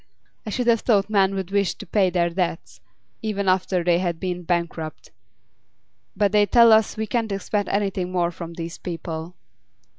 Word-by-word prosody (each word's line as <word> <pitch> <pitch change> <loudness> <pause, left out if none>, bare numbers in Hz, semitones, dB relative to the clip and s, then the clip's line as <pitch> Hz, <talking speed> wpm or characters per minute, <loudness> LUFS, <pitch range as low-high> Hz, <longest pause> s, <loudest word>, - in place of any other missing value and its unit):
I - - -2
should 245 +4 -2
have 235 -1 +4
thought 210 -3 +1
men 195 -2 +3
would 190 -1 -4
wish 200 -2 +1
to - - -10
pay 190 +1 +2
their 175 -1 +1
debts, 175 -1 -3 0.4
even 205 -3 -2
after 185 -1 +1
they 175 0 +3
had 175 -3 -2
been 180 -1 -3
bankrupt; 170 -2 -3 1.1
but 205 -2 +2
they 205 -1 +4
tell 235 +2 +6
us 220 0 +4
we 220 - -1
can't 225 -1 -1
expect 200 +1 -2
anything 195 -3 -1
more 175 -1 0
from 170 0 -8
these 165 0 -6
people. 165 0 -6
190 Hz, 175 wpm, -23 LUFS, 175-205 Hz, 1.1 s, tell